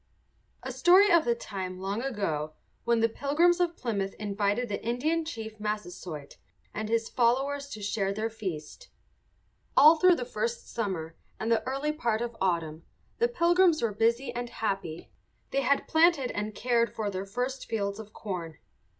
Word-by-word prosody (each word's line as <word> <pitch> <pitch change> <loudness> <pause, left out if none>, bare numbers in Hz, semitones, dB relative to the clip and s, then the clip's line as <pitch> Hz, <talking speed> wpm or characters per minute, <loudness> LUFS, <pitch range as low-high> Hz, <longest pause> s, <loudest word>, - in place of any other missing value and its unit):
A - - -4
story 380 +4 +6
of 340 -2 +5
the 235 -1 +2
time 190 -5 -6
long 195 +4 -2
ago 180 - -2 0.3
when 235 -1 +3
the 230 - +5
Pilgrims 310 +9 +2
of 345 -1 0
Plymouth 200 -5 -2
invited 205 +3 -1
the 205 - -4
Indian 300 +8 0
chief 220 -8 -7
Massasoit 180 -8 -5 0.4
and 215 0 -4
his 225 0 +1
followers 270 +4 +1
to 215 -6 -7
share 200 -1 0
their 215 +3 -1
feast. 200 - -6 0.9
All 310 +3 +9
through 365 +1 +6
the 250 - -4
first 235 -1 -3
summer 180 -8 -3 0.2
and 225 +1 -1
the 230 - +3
early 275 +3 -1
part 235 -7 -1
of 235 -1 -5
autumn 165 -4 -1 0.4
the 470 - +4
Pilgrims 345 - +3
were 225 -3 +1
busy 235 +4 +1
and 240 0 -4
happy. 195 -8 -4 0.4
They 275 - +1
had 280 0 +1
planted 320 -5 +4
and 210 0 -4
cared 235 -2 +1
for 210 -2 -2
their 190 +1 -4
first 250 +6 -3
fields 200 -2 -2
of 215 -1 -9
corn. 175 -8 -6
225 Hz, 165 wpm, -28 LUFS, 200-275 Hz, 0.9 s, All